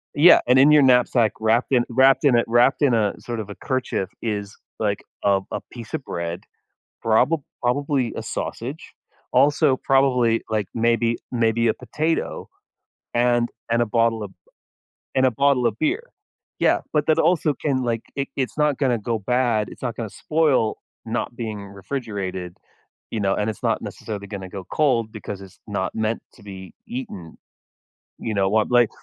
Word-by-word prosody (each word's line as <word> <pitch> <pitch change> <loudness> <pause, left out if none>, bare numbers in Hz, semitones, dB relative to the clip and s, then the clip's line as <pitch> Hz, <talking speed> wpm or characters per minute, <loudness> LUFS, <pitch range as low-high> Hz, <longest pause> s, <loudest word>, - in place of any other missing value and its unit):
Yeah. 160 +5 +8
And 125 +1 +5
in 145 +3 +7
your 150 -2 +7
knapsack, 125 -3 +4
wrapped 115 +4 +2
in 125 -2 +4
wrapped 130 +4 +4
in 130 -4 +5
a 120 - +3
wrapped 120 +5 +3
in 130 -4 +4
a 105 -3 +2
sort 120 -2 -5
of 105 -2 -6
a 100 - -7
kerchief 130 -8 -2
is, 105 -3 -3 0.2
like, 105 -2 -1 0.2
a 100 -1 +3
a - - -3
piece 120 +3 -10
of 155 - -2
bread, 85 -4 -4 0.6
probob 125 +8 +3 0.2
probably 130 -1 0
a - - -4
sausage. 135 +7 -5 0.4
Also, 145 -1 +4
probably, 125 -4 +3
like, 110 -3 -1
maybe 115 0 +2 0.2
maybe 115 -1 +2
a - - +2
potato 155 +7 -2 0.7
and 120 0 +2 0.2
and 120 0 +3
a - - +3
bottle 115 -1 +1
of 100 - -7
b - - -27 0.8
and 130 0 +5
a 130 - +3
bottle 135 0 +2
of - - 0
beer. 380 +11 -1 0.5
Yeah. - - +3
But 150 -1 +1
that 160 0 +3
also 160 -2 +2
can 130 -1 -1
like 115 -1 -1
it 140 0 -2
it's 130 0 -2
not 150 -3 +2
gonna 125 -5 +1
go 115 +1 -2
bad. 120 -2 +1
It's - - -13
not 120 -3 -3
gonna 110 -4 -4
spoil 150 -8 +1 0.3
not 120 +1 -3
being 110 -3 -4 0.2
refrigerated, 95 -8 -4 0.5
you 110 - -3
know, 95 -1 +1
and 105 +1 -1
it's 105 - -9
not - - +1
necessarily 100 -2 -6
gonna 95 -2 -7
go 95 -1 -7
cold 120 -7 +2
because 105 -2 -7
it's 95 -2 -13
not - - -3
meant 110 +1 -1
to 110 - -18
be 95 -2 -10
eaten. 230 -3 -7 0.8
You 110 - -3
know, 95 -1 +2
what, 110 +2 +2
like 120 -3 +5
120 Hz, 175 wpm, -23 LUFS, 110-135 Hz, 0.8 s, Yeah